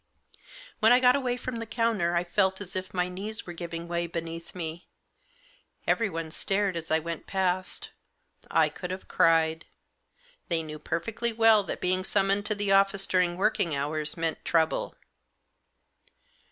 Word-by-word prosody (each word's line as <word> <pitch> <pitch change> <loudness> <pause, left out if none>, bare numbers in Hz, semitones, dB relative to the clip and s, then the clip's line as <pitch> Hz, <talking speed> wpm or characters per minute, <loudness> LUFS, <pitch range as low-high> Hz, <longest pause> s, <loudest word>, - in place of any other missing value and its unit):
When 220 +2 +5
I 245 - +7
got 250 -1 +5
away 250 -3 0
from 250 -1 -5
the 230 - -5
counter 220 -7 +1
I 170 - +2
felt 190 +2 +1
as 195 -3 -8
if 185 0 -4
my 180 -1 0
knees 200 +4 -5
were 175 - -7
giving 170 0 -6
way 170 0 -1
beneath 165 0 -6
me. 165 -1 -6 1.0
Everyone 165 -8 0
stared 195 +2 0
as 165 -1 -5
I 160 - +4
went 165 0 -5
past 190 - -1 0.3
— - - -46 0.2
I - - +4
could 180 - -7
have 185 +1 -6
cried. 165 0 +3 0.8
They 165 -2 0
knew 155 -1 -7
perfectly 230 +10 -2
well 225 -1 +5
that - - -5
being 185 +1 +1
summoned 195 +1 +1
to 215 - 0
the 205 -1 -1
office 195 0 +4
during 180 -2 +1
working 190 -6 +1
hours 150 +3 -1
meant 165 -1 -2
trouble. 160 -1 +1
185 Hz, 160 wpm, -28 LUFS, 165-205 Hz, 1.0 s, I